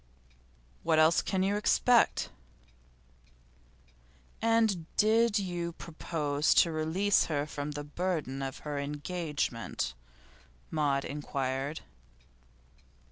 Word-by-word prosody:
'What 160 Hz, -, +2 dB
else 160 Hz, +1 st, +5 dB
can 190 Hz, -1 st, 0 dB
you 200 Hz, +1 st, +1 dB
expect?' 235 Hz, +3 st, +3 dB, 2.1 s
'And 220 Hz, -7 st, +2 dB
did 220 Hz, 0 st, +4 dB
you 175 Hz, -3 st, -2 dB
propose 155 Hz, -3 st, -1 dB
to 170 Hz, -, +5 dB
release 160 Hz, +6 st, +2 dB
her 145 Hz, -3 st, -1 dB
from 150 Hz, 0 st, -5 dB
the 145 Hz, 0 st, -5 dB
burden 150 Hz, -3 st, -3 dB
of 135 Hz, 0 st, -4 dB
her 145 Hz, -1 st, -2 dB
engagement?' 150 Hz, -4 st, -3 dB, 0.8 s
Maud 145 Hz, -3 st, +1 dB
inquired. 140 Hz, 0 st, -3 dB
155 Hz, 90 wpm, -30 LUFS, 145-185 Hz, 2.1 s, else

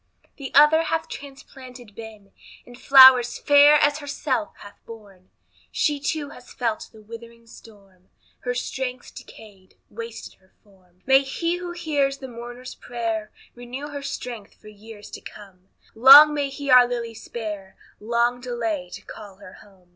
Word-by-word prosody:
The 275 Hz, -2 st, -8 dB
other 300 Hz, +3 st, +6 dB
hath 325 Hz, 0 st, -3 dB
transplanted 260 Hz, -4 st, -12 dB
been, 215 Hz, -3 st, -13 dB, 0.3 s
And 245 Hz, -, -14 dB
flowers 260 Hz, -2 st, +6 dB
fair 290 Hz, 0 st, +5 dB
as 290 Hz, 0 st, +2 dB
herself 280 Hz, -5 st, -4 dB
hath 205 Hz, -, -15 dB
borne; 200 Hz, -5 st, -15 dB, 0.4 s
She 295 Hz, -1 st, -1 dB
too 290 Hz, 0 st, -4 dB
has 250 Hz, -4 st, -15 dB
felt 230 Hz, -3 st, -4 dB
the 220 Hz, -1 st, -17 dB
withering 230 Hz, +1 st, -13 dB
storm, 195 Hz, -5 st, -19 dB, 0.3 s
Her 245 Hz, -1 st, -4 dB
strength's 250 Hz, 0 st, -6 dB
decayed, 200 Hz, -4 st, -16 dB, 0.2 s
wasted 230 Hz, +1 st, -10 dB
her 185 Hz, 0 st, -32 dB
form. 185 Hz, -3 st, -28 dB
May 265 Hz, 0 st, +5 dB
he 335 Hz, +5 st, -3 dB
who 355 Hz, 0 st, -7 dB
hears 290 Hz, -5 st, -2 dB
the 265 Hz, -, -10 dB
mourner's 245 Hz, +1 st, -10 dB
prayer, 225 Hz, -3 st, -5 dB, 0.2 s
Renew 250 Hz, +4 st, -9 dB
her 285 Hz, -1 st, -7 dB
strength 245 Hz, -6 st, -8 dB
for 215 Hz, -, -15 dB
years 210 Hz, 0 st, -14 dB
to -, -, -10 dB
come; 190 Hz, -3 st, -15 dB, 0.2 s
Long 280 Hz, +6 st, +8 dB
may 285 Hz, -2 st, -2 dB
He 275 Hz, 0 st, -5 dB
our 250 Hz, -1 st, +7 dB
Lilly 235 Hz, -2 st, -5 dB
spare, 210 Hz, -4 st, -8 dB, 0.2 s
Long 235 Hz, +3 st, -1 dB
delay 225 Hz, -7 st, -4 dB
to -, -, -10 dB
call 205 Hz, -2 st, -12 dB
her 195 Hz, -1 st, -15 dB
home. 190 Hz, -3 st, -23 dB
240 Hz, 155 wpm, -22 LUFS, 210-275 Hz, 0.4 s, Long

